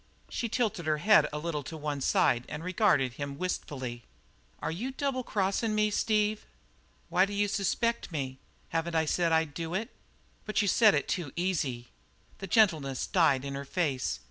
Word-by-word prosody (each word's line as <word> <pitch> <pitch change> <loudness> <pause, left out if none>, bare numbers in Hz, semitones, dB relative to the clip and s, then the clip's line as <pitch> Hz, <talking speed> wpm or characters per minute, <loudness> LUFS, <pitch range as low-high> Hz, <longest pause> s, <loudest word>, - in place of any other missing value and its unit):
She 235 - -3
tilted 215 -8 -1
her 155 -1 +2
head 180 -2 +5
a 150 - -4
little 150 -1 -3
to 160 +4 -8
one 145 -2 -3
side 120 -2 +2
and 150 +2 -6
regarded 180 - +2
him 140 +1 -5
wistfully. 130 -8 -4 0.6
"Are - - -2
you 215 +11 -3
double 270 -1 -2
crossin' 210 +1 0
me, 210 0 +2
Steve?" 210 0 +1 0.7
"Why 185 +2 +3
d'you 205 0 0
suspect 220 +3 0
me? 135 -4 -4 0.3
Haven't 165 +1 -2
I 160 0 +3
said 170 +2 +1
I'd 160 -2 +2
do 165 +3 -4
it?" 220 +4 -2 0.5
"But 215 - -1
you - - 0
said 215 +1 +5
it 145 - -1
too 170 -8 -2
easy." 150 -10 -1 0.5
The 195 - -6
gentleness 160 - +2
died 140 -7 +3
in 140 - -4
her 140 0 -4
face. 140 -3 -1
170 Hz, 170 wpm, -29 LUFS, 145-205 Hz, 0.7 s, head